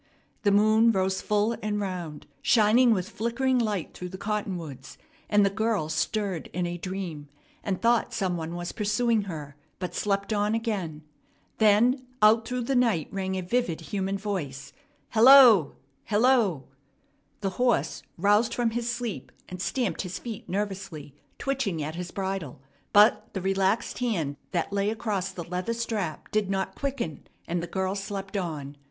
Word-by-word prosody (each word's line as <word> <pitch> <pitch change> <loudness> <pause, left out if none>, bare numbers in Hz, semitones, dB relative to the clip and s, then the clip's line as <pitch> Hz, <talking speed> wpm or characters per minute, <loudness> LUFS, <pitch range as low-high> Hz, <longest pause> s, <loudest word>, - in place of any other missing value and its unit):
The 205 - +3
moon 215 +3 +5
rose 190 -2 0
full 210 +2 +1
and 210 0 -1
round, 180 -6 -5 0.2
shining 235 +2 +5
with 190 -4 +1
flickering 245 +3 0
light 210 -7 -2
through 180 - -7
the 190 - -8
cottonwoods; 180 - -4 0.3
and 205 -1 +4
the 195 - +2
girl 215 -6 0
stirred 185 +2 -2
in 180 0 -1
a 175 0 -4
dream 175 -6 -5 0.3
and 195 -3 -2
thought 235 0 +2
some 185 -3 -1
one 165 0 -4
was 175 0 -4
pursuing 215 0 +1
her, 150 -6 -7 0.2
but 180 -1 -5
slept 200 +1 -1
on 210 +1 +1
again. 190 -10 -3 0.6
Then 230 +5 +4 0.2
out 220 +1 +5
through 250 -1 -2
the 270 +3 -1
night 230 -11 +2
rang 190 -1 -2
a 185 - -2
vivid 180 -4 0
human 195 +4 -2
voice, 155 -10 -4 0.4
"Hello! 235 - +8 0.3
Hello!" 220 - +3 0.8
The 195 -2 -1
horse 245 -2 +1 0.2
roused 210 +5 +3
from 240 -2 +1
his 240 +1 -2
sleep, 240 -4 -5 0.2
and 180 0 -6
stamped 245 +2 -1
his 185 -1 -5
feet 225 -4 -7
nervously, 190 -7 -4 0.2
twitching 240 - -1
at 155 +2 -4
his 175 +1 -5
bridle; 190 -9 -4 0.3
but 210 +2 +5
the 190 - -3
relaxed 195 +5 0
hand 170 - -1
that 175 +2 -2
lay 200 0 +1
across 210 -4 -2
the 180 -2 -6
leather 180 +6 -3
strap 215 -9 -3
did 210 -2 +1
not 190 -1 -1
quicken, 270 - -4 0.2
and 175 0 -1
the 170 - -5
girl 190 +2 -1
slept 195 0 -5
on. 150 -7 -4
200 Hz, 160 wpm, -27 LUFS, 180-225 Hz, 0.8 s, Hello